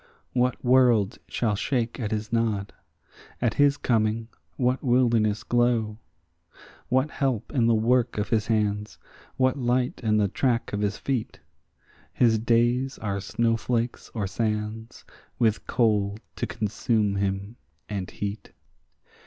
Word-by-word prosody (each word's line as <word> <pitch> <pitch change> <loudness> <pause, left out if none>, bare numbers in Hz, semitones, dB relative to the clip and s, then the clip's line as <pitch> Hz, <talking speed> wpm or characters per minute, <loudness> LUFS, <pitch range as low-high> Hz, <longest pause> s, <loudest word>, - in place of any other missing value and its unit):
What 125 0 0
world 120 -5 +4
shall 110 -3 0
shake 120 +4 -1
at 110 -4 -2
his 110 +1 -3
nod? 110 -4 0 0.7
at 120 -3 +1
his 145 0 +3
coming 110 -2 0 0.3
what 125 0 +1
wilderness 120 -5 +2
glow? 120 -3 +1 0.9
What 130 +4 +2
help 135 -5 -2
in 120 -5 +3
the 115 - +4
work 120 +2 +2
of 105 - -1
his 110 -2 +1
hands? 105 -2 0 0.4
what 130 +1 +2
light 125 0 0
in 110 -1 +2
the 105 -1 +3
track 120 +3 0
of 105 - -1
his 100 0 -1
feet? 130 -5 -3 0.7
His 115 -3 +3
days 120 +3 +1
are 100 -2 -3
snowflakes 115 +3 -1
or 105 -3 -1
sands, 105 +2 -3 0.3
with 110 -4 +1
cold 105 -3 +1 0.2
to - - -2
consume 105 -1 0
him 100 +3 -2 0.3
and 100 -3 -4
heat. 100 +1 -6
115 Hz, 130 wpm, -26 LUFS, 105-125 Hz, 0.9 s, world